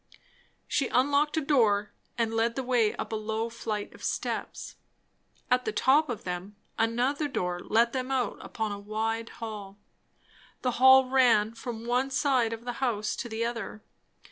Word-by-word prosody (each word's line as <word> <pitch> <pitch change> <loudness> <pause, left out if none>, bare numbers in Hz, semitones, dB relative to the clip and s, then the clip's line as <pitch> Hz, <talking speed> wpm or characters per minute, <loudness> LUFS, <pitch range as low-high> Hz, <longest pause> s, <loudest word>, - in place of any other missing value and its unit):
She 275 - +1
unlocked 285 +4 +2
a - - +2
door 220 -8 +2 0.3
and 230 -1 0
led 230 +1 +1
the 265 - -2
way 245 -4 +2
up - - -5
a - - -1
low 220 +1 -2
flight 215 -3 -4
of - - -14
steps. - - -3 0.8
At 250 0 +3
the 215 - -2
top 275 +8 +3
of 235 -4 -4
them 180 +3 -5 0.2
another 245 +6 +1
door 180 -10 -2
let 230 +5 +2
them 260 0 -2
out 260 -2 -1
upon 220 -2 -3
a 200 - -5
wide 225 +2 -2
hall. 210 -3 -8 0.9
The 250 - +2
hall 260 0 +8
ran 240 -5 +4
from 230 0 -7
one 250 +3 +1
side 260 -4 +2
of 230 +1 -6
the 245 - -3
house 215 -5 0
to 240 - -5
the 225 +1 -2
other. 230 -2 -5
230 Hz, 170 wpm, -28 LUFS, 215-255 Hz, 0.9 s, hall